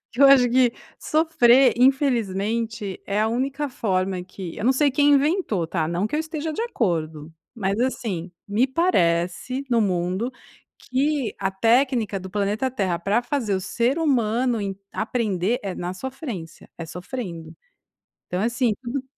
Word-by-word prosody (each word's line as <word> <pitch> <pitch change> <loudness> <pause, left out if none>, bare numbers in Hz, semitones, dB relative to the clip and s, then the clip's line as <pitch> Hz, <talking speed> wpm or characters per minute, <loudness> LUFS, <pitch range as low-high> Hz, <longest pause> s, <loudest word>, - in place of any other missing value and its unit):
Eu 275 +3 +6
acho 270 -3 +7
que 250 -1 +3 0.2
sofrer, 275 -5 +4
infelizmente, 230 -5 0
é 200 +1 -1
a 215 - +2
única 270 +5 -1
forma 185 -5 -1
que 185 -1 -8
eu - - -5
não 250 - +4
sei 285 +2 +3
quem 290 +2 +3
inventou 280 - +1
tá, 160 -2 -1
não 175 +5 0
que 215 - -5
eu 305 - +1
esteja 315 -1 -4
de 375 - -4
acordo, 160 - -2 0.2
mas, 200 -2 -1
assim, 205 -9 -2 0.2
me 215 +6 +2
parece, 255 - 0
no 235 - +3
mundo 185 +3 0 0.5
que 275 0 -1
a 195 -1 -1
técnica 230 0 +2
do 190 - -8
planeta 210 +6 -1
Terra 190 -8 -1
pra 205 +7 +1
fazer 240 -5 -1
o 190 - -1
ser 240 - 0
humano 245 -5 +1
em 195 -1 -3 0.2
aprender 220 -2 -1
é 195 -2 -4
na 180 +1 -4
sofrência 245 - -7
é 165 - -6
sofrendo. 180 -1 -7 0.7
Então, 180 +1 -2
assim, 235 0 +1
tudo 255 +2 -4
230 Hz, 155 wpm, -23 LUFS, 190-260 Hz, 0.7 s, acho